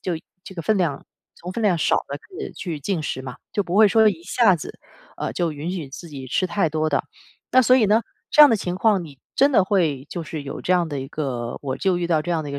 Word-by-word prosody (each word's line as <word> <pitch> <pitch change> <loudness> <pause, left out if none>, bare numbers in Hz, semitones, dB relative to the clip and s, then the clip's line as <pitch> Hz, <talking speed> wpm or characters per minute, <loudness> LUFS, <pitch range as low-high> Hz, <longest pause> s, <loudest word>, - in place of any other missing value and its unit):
就 180 -3 -2 0.3
这 190 - -11
个 170 - -5
分 215 +4 +1
量 155 -6 -1 0.3
从 180 +2 -8
分 230 - -4
量 195 -5 +3
少 160 - +2
的 140 - -4
可 390 - -10
以 - - -5
去 165 -6 -5
进 170 +1 -2
食 130 - -3
嘛， 130 -2 -8 0.2
就 205 - +1
不 180 +1 -3
会 215 0 +8
说 220 +1 +5
一 170 -5 -3
下 195 0 +3
子， 155 - -9 0.4
呃， - - -3
就 170 -3 0
允 150 +4 -5
许 165 -8 -5
自 170 +4 -9
己 135 -3 -8
吃 185 +8 0
太 175 -4 0
多 155 0 0
的。 145 - 0 0.5
那 255 - +6
所 255 +1 +5
以 235 - +4
呢， 210 +3 +4 0.3
这 300 - +5
样 295 - +11
的 230 - +3
情 180 -2 -3
况 195 -2 +2
你 140 -4 -13 0.2
真 280 +1 +4
的 195 - +5
会 160 -9 +1
就 175 - -4
是 155 -2 -6
有 140 - -6
这 - - -3
样 175 -2 +2
的 145 -2 -4
一 135 - -7
个 125 -6 -4
我 130 -2 -2
就 190 -2 +1
遇 175 - -1
到 160 -3 +2
这 175 - -4
样 165 -2 0
的 145 - -7
一 - - -7
个 140 - -3
175 Hz, 300 characters per minute, -22 LUFS, 150-200 Hz, 0.5 s, 样